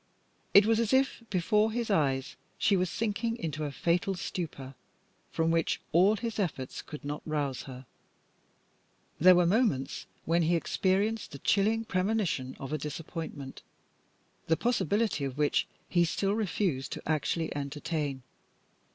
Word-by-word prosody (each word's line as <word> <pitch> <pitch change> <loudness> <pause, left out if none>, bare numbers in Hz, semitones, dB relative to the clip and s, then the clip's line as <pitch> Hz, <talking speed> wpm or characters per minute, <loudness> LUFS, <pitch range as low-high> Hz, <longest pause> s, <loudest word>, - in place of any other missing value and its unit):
It 200 +1 +9
was 225 0 +3
as 230 +1 +1
if 265 -1 +2
before 210 +4 +2
his 235 -1 -2
eyes 135 -7 +1 0.2
she 200 - +3
were 185 0 +1
sinking 225 +4 -1
into 155 - -3
a 145 - -3
fatal 175 +6 0
stupor, 150 -7 -5 0.6
from 165 0 +1
which 165 -1 +1
all 190 +6 +5
his 225 0 -4
efforts 150 -9 -3
could 150 -2 -9
not 145 +1 -4
rouse 145 -4 -2
her. 130 0 -9 1.3
There 185 +3 +8
were 175 0 +4
moments 175 - +1 0.2
when 170 +2 +2
he 170 +1 +3
experienced 195 +5 0
the - - -6
chilling 220 +8 +2
premonition 185 -10 -1
of 135 +2 -5
a 155 - -1
disappointment, 150 -1 -6 0.9
the 160 - +3
possibility 220 - +1
of 135 -1 -3
which 150 -1 +2 0.2
he 175 -1 +3
still 195 +4 0
refused 185 -9 -1
to - - -7
actually 160 +1 0
entertain. 145 -1 -3
170 Hz, 145 wpm, -30 LUFS, 145-210 Hz, 1.3 s, It